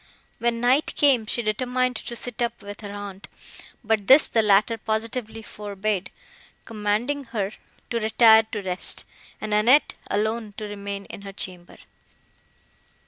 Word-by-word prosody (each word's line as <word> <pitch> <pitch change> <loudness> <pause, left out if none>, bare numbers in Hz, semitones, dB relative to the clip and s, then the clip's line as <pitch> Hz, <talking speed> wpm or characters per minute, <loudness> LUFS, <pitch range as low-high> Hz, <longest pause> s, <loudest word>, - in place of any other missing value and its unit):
When 235 0 0
night 255 +5 +2
came, 260 -7 +3
she 240 - 0
determined 250 +3 0
to 235 - -6
sit 245 0 -5
up 235 -2 -2
with 205 +1 -9
her 205 -1 -7
aunt, 200 -1 -8 0.6
but 215 -2 0
this 270 +3 +8
the 225 - +2
latter 210 +2 +3
positively 225 +1 -3
forbade, 205 -2 -3 0.6
commanding 225 +6 -1
her 210 -4 -3 0.4
to 235 - 0
retire 220 0 +6
to 210 -2 -4
rest, 180 -1 +1 0.3
and 215 -1 -4
Annette 240 +8 +4 0.2
alone 215 0 -1
to - - -6
remain 200 -1 -6
in - - -10
her 200 0 -9
chamber. 180 -2 -7
220 Hz, 140 wpm, -24 LUFS, 205-235 Hz, 0.6 s, this